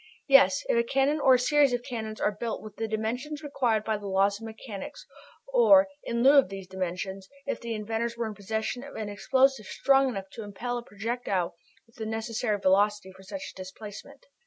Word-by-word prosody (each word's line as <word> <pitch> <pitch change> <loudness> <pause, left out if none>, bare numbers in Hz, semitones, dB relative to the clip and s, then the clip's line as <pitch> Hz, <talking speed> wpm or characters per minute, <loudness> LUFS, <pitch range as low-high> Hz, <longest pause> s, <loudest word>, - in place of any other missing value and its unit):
Yes, 275 +1 +6
if - - +2
a 235 - +3
cannon 275 +5 +1
or 265 -3 +6
a - - +2
series 285 +1 +3
of 245 0 -1
cannons 220 -4 -5
are - - +2
built 230 -2 -3
with 215 -1 -10
the 225 - -2
dimensions 245 +8 -3
required 245 -7 0
by 220 -1 -1
the 205 -1 -8
laws 195 +2 +2
of 225 - -6
mechanics, 220 -3 -8 0.5
or, 295 -13 +7 0.2
in 235 0 -1
lieu 280 +2 +8
of 270 - +1
these 195 -1 -7
dimensions, 190 +1 -5 0.2
if 280 - -3
the 235 -1 -3
inventors 225 +2 -3
were 235 - -1
in 220 - -4
possession 220 +5 -3
of 280 - -10
an 215 -2 -4
explosive 250 +3 +2
strong 270 -1 +3
enough 195 -5 -6
to - - -8
impel 235 +5 -4
a - - -10
projectile 205 -5 -2 0.3
with 230 - -26
the 220 -1 -4
necessary 220 0 -1
velocity 200 +1 +2
for 190 +1 -16
such 280 +10 -7
a - - -26
displacement. 205 - -10
225 Hz, 205 wpm, -28 LUFS, 205-255 Hz, 0.5 s, lieu